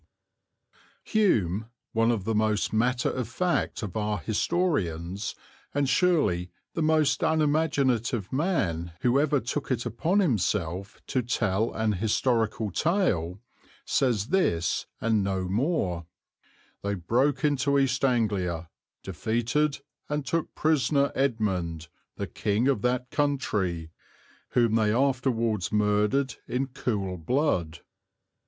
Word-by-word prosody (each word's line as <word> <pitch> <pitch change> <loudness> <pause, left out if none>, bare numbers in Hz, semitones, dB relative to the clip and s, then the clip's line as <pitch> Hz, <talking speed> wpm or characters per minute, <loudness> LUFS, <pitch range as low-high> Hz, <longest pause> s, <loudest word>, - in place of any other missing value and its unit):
D. - - -16
Hume, 110 - +2 0.3
one 115 +1 +3
of 115 -5 0
the 110 +3 -1
most 110 -1 +1
matter 125 +3 +1
of 125 -4 -3
fact 175 0 -1
of 100 -4 -5
our 105 -1 0
historians, 100 - -1 0.4
and 145 -1 +2
surely 135 - +2 0.2
the 165 - -2
most 155 -1 +2
unimaginative 140 - +1
man 90 - 0
who 125 +2 +3
ever 145 -1 +2
took 130 +4 -4
it 125 -2 -1
upon 140 - 0
himself 100 - 0
to 130 - 0
tell 110 -3 0
an 110 -1 +1
historical 110 +1 0
tale, 100 - 0 0.4
says 120 -4 +1
this 90 - +1
and 110 -3 +1
no 95 -1 -1
more: 95 - -1 0.7
"They 100 0 -1
broke 130 - +1
into 140 -1 +2
East 135 -1 +1
Anglia, 95 -10 0 0.3
defeated 120 - 0 0.3
and 150 -1 -2
took 165 +2 -2
prisoner 145 -2 +2
Edmund, 95 - -1 0.3
the - - -3
king 105 +5 0
of 135 -7 +2
that 125 +1 -1
country, 100 - -1 0.6
whom 115 -3 +3
they 110 -2 +3
afterwards 120 -5 +1
murdered 105 +5 +1
in 130 +2 -1
cool 100 -8 -2
blood." 85 - 0
115 Hz, 120 wpm, -27 LUFS, 100-140 Hz, 0.7 s, one